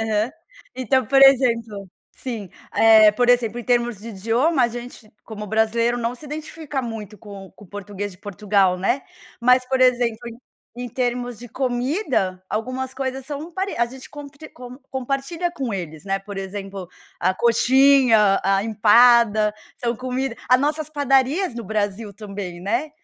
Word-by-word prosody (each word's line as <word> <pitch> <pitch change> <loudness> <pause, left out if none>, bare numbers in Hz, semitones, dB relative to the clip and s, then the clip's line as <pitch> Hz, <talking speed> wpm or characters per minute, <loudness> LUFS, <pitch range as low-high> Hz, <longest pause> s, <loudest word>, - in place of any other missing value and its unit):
aham. 220 +1 0 0.4
Então, 260 0 0
por 270 +2 +3
exemplo 230 -7 +3 0.2
sim, 225 -8 -7 0.2
eh, 220 -1 +7
por 245 +3 +2
exemplo, 240 -2 +1
em 240 - -7
termos 240 -3 0
de 220 +4 -10
idioma, 240 - +1
a - - +1
gente, 240 -2 -9
como 210 -1 -8
brasileiro, 225 +3 +1
não 235 0 -2
se 275 +5 -12
identifica 300 -1 -5
muito 220 -3 -7
com 200 -2 -11
o - - -18
com 210 - -16
o - - -19
português 205 0 -6
de 180 - -17
Portugal, 200 -2 +1
né. 195 +9 0 0.4
Mas, 250 +1 +4
por 265 0 0
exemplo, 245 -3 +3
em 230 0 -11 0.4
em 245 0 -5
termos 245 -1 -3
de 245 +1 -10
comida, 250 - -1
algumas 255 +4 -4
coisas 265 -1 -4
são 300 +3 -6
pare 385 +3 -3
a 235 - +2
gente 260 +2 -12
compre 290 +1 -11
com 250 0 -11
compartilha 275 +7 -3
com 270 -9 -4
eles, 160 -4 -7
né. 195 0 -1
Por 200 0 -9
exemplo, 195 -1 -7 0.3
a 185 +2 +1
coxinha, 235 -2 +4
a 195 0 +2
empada, 220 0 +4 0.2
são 235 -1 -2
comida 255 0 -3
a 255 - +6
nossas 300 +2 -2
padarias 285 +3 +1
no 235 -1 -6
Brasil 205 +1 -3
também, 195 -4 -7
né. 235 - -2
235 Hz, 165 wpm, -22 LUFS, 210-260 Hz, 0.4 s, eh